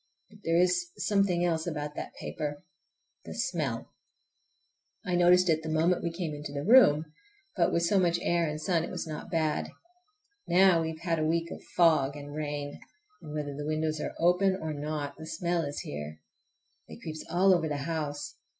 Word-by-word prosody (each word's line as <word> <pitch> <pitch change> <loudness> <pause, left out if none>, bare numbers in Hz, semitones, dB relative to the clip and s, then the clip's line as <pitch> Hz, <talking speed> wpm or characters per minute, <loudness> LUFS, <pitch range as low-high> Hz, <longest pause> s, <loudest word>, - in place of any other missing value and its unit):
But 210 - -16
there 165 0 +2
is 180 0 +2
something 195 -4 +2
else 165 -1 0
about 150 -3 -3
that - - -7
paper—the 145 -2 -8
smell! 155 - -2 1.1
I 180 - -2
noticed 180 +1 +5
it 160 -2 +2
the 160 - -5
moment 165 +3 +2
we 170 - -2
came 165 -2 -4
into 145 0 -6
the 140 0 -4
room, 160 - +6 0.4
but 175 - +2
with 170 - +1
so 190 +4 +3
much 170 -2 +2
air 170 -1 +2
and 150 0 -4
sun 165 +1 +1
it - - -5
was - - -4
not 155 -1 -7
bad. 160 -3 0 0.8
Now 180 -1 +5
we 160 - -1
have 160 0 -8
had 170 -2 0
a - - 0
week 165 +2 0
of - - -7
fog 155 -5 +4
and 145 0 -8
rain, 145 -1 -4 0.4
and 150 - -9
whether 145 -2 -4
the 145 +1 -5
windows 155 0 -1
are - - -4
open 180 +3 +3
or 160 -4 -4
not, 145 -1 -4
the 160 - -8
smell 170 +1 -1
is 145 -2 -4
here. 75 +1 -7 0.7
It 80 - -12
creeps 155 -1 -6
all 190 +2 +4
over 170 -3 +1
the 145 - -1
house. 150 -2 -4
160 Hz, 185 wpm, -29 LUFS, 150-175 Hz, 1.1 s, room